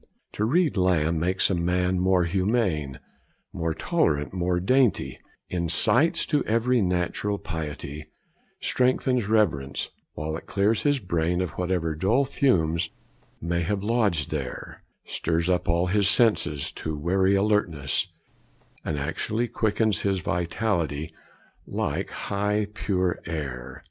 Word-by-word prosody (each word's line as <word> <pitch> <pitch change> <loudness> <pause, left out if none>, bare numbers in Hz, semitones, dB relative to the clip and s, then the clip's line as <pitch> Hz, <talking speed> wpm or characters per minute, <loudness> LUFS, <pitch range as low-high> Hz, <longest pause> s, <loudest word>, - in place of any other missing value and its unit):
To 105 - 0
read 155 - +2
Lamb 85 -3 +2
makes 90 +4 +1
a - - +2
man 90 +1 +1
more 95 0 +3
humane, 90 - 0 0.5
more 80 -1 -2
tolerant, 75 +1 0
more 90 -1 0
dainty; 125 +3 +2 0.3
incites 115 - +3
to 145 -2 +1
every 115 +2 +2
natural 90 +2 -1
piety, 75 -3 -6 0.5
strengthens 125 -2 +1
reverence; 85 -11 +1 0.2
while 80 +1 -3
it 80 - -8
clears 100 +3 +1
his 145 -1 +2
brain 90 -5 -1
of 90 -3 -1
whatever 90 -3 -1
dull 100 - +2
fumes 85 - +1 0.5
may 85 +1 -1
have 100 +3 -1
lodged 105 -9 +1
there, 70 -5 -5 0.2
stirs 85 +2 0
up 90 -1 0
all 85 +1 +2
his 100 +1 +2
senses 105 - +2
to 80 -1 -5
wary 95 +5 +2
alertness, 95 -9 +1 0.8
and 75 - -2
actually 85 +11 -1
quickens 110 -4 0
his 100 -1 +1
vitality, 85 -3 -1 0.5
like - - -2
high 105 +1 -1
pure 95 -3 -1
air. 65 -4 -5
90 Hz, 125 wpm, -25 LUFS, 80-105 Hz, 0.8 s, more